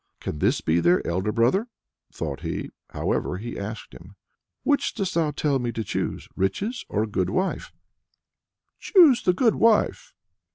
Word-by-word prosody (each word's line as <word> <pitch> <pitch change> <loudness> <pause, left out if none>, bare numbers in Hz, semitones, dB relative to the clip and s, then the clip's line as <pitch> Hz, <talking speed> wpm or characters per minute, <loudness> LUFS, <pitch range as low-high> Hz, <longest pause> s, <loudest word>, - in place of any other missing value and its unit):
"Can 75 - -5
this - - +2
be 80 +2 +2
their 85 +1 +3
elder 95 +5 -1
brother?" 120 - +2 0.4
thought - - -5
he - - -4 0.2
however 90 - -2
he 115 +4 -6
asked 105 +2 -7
him: 90 +4 -14 0.5
"Which 285 - +1
dost 190 -2 -2
thou 165 -2 +1
tell 145 -1 0
me 120 -1 -2
to 115 - -3
choose - - -3
riches, 205 - -2
or 105 - 0
a - - -3
good 95 -3 -1
wife?" 185 +1 -2 1.1
"Choose 330 - +5
the 180 - +2
good 225 +4 +3
wife." 225 -2 +2
120 Hz, 160 wpm, -25 LUFS, -, 1.1 s, Choose